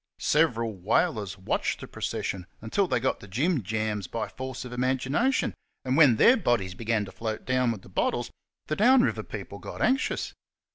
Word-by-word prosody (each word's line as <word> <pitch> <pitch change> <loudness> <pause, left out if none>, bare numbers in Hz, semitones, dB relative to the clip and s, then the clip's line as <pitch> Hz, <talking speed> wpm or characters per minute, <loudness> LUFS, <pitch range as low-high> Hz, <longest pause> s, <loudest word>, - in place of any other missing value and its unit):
Several 115 -8 +2
whalers 105 - 0
watched 95 - -1
the - - -8
procession 90 -2 -4
until 150 - 0
they 125 - +1
got 130 - 0
the 100 - -12
jimjams 110 - -1
by 110 -2 -3
force 130 +2 -6
of 125 - -7
imagination, 130 - +1 0.3
and 130 0 +1
when 145 -6 +7
their 235 - +6
bodies 120 - 0
began 110 +1 -1
to 95 - -10
float 110 0 -4
down 130 -2 +2
with 105 -5 -6
the - - -14
bottles, - - -1 0.3
the 155 - -2
down 245 +6 +6
river - - 0
people - - -8
got - - -8
anxious. 265 +2 +1
120 Hz, 175 wpm, -27 LUFS, 110-150 Hz, 0.3 s, when